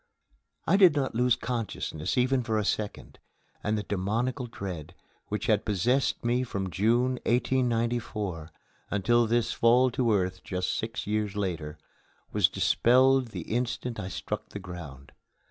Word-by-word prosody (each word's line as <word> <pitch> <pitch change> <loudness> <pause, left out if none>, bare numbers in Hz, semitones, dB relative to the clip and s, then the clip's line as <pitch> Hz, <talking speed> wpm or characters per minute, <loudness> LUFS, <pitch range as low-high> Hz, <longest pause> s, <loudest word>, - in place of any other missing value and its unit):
I 195 - +4
did 185 -6 +7
not 135 -2 0
lose 125 +1 +3
consciousness 115 -10 -3
even 130 +1 +3
for 115 -2 -1
a 105 - 0
second, 105 0 -3 0.4
and 105 +1 0
the 105 - -2
demoniacal 115 +7 -1
dread, 95 -9 -7 0.3
which 105 - -3
had 110 -1 +2
possessed 120 +7 +1
me 120 +1 +2
from 100 -7 -3
June, 120 +6 +2
1894, 115 -8 0 0.4
until 115 +4 +2
this 120 0 +1
fall 125 +2 +4
to 120 -2 +1
earth 95 -2 0
just 90 0 -2
six 110 0 -4
years 105 -1 -1
later, 85 -7 -3 0.5
was - - +3
dispelled 130 +2 +4
the 100 -6 -6
instant 120 +3 -3
I 90 - -4
struck - - -5
the - - -7
ground. 85 -8 -9
110 Hz, 145 wpm, -28 LUFS, 95-125 Hz, 0.5 s, did